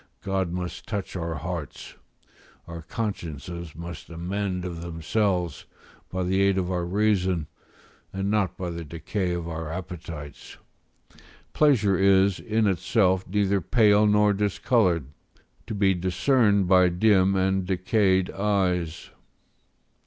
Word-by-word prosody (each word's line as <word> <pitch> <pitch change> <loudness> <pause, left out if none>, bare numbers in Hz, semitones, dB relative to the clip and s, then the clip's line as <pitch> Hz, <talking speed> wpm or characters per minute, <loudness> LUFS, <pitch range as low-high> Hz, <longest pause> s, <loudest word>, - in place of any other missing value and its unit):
God 95 -3 -1
must 90 0 -5
touch 100 -3 -4
our 85 -2 -3
hearts; 85 -3 -6 0.7
our 85 0 -8
consciences 85 -4 -5
must 85 0 -8
amend 90 +2 -3
of 85 -2 -5
themselves, 85 0 -1 0.4
by 95 0 -2
the 95 +2 +1
aid 100 -1 +3
of 90 -1 -1
our 90 -1 -1
reason, 95 -4 +1 0.7
and 95 +1 -2
not 95 -4 0
by 90 -2 -4
the 85 0 -6
decay 90 +4 -3
of 85 -1 -3
our 80 -1 -5
appetites; 80 -5 -8 1.0
pleasure 110 -11 +3
is, 95 -1 +4
in 110 0 0
itself, 95 0 +1
neither 100 0 +1
pale 105 +2 +4
nor 105 0 +4
discoloured, 100 - +1 0.6
to 110 - -4
be 100 -1 +3
discerned 100 +3 +2
by 90 0 +5
dim 95 +1 +3
and 95 0 +1
decayed 95 0 +1
eyes. 90 -5 -1
95 Hz, 125 wpm, -25 LUFS, 85-100 Hz, 1.0 s, by